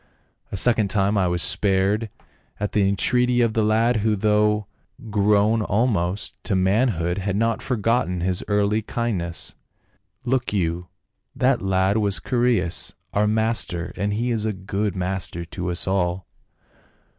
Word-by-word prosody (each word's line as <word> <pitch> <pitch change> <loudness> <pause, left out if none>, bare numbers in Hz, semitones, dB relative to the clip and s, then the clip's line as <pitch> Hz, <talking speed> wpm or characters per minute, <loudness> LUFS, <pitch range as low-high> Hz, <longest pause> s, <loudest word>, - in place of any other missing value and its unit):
A - - -3
second 115 0 +4
time 100 +1 +1
I 95 -3 +2
was 85 -1 0
spared 100 +4 +1 0.5
at 105 0 -2
the 100 -2 +2
entreaty 125 +5 +2
of 115 -2 +2
the 110 - +1
lad, 115 +3 +2
who 110 0 +1
though 105 0 +2 0.5
grown 105 +2 +3
almost 105 -3 0
to 100 - 0
manhood 95 -2 +1
had 100 0 -2
not 115 +2 0
forgotten 115 -6 0
his 90 0 -1
early 105 +1 +1
kindness. 100 -7 -3 0.7
Look 130 0 0
you, 90 -2 -1 0.5
that 130 -1 +2
lad 95 +2 +1
was 100 -2 0
Chaereas, 120 -8 0 0.2
our 105 +1 +2
master, 110 -5 -1
and 100 0 -1
he 120 +4 -1
is 110 -2 -1
a 110 -1 -1
good 100 +1 -3
master 90 -2 -3
to 90 +2 -5
us 90 +1 -1
all." 95 -1 0
105 Hz, 145 wpm, -23 LUFS, 95-110 Hz, 0.7 s, second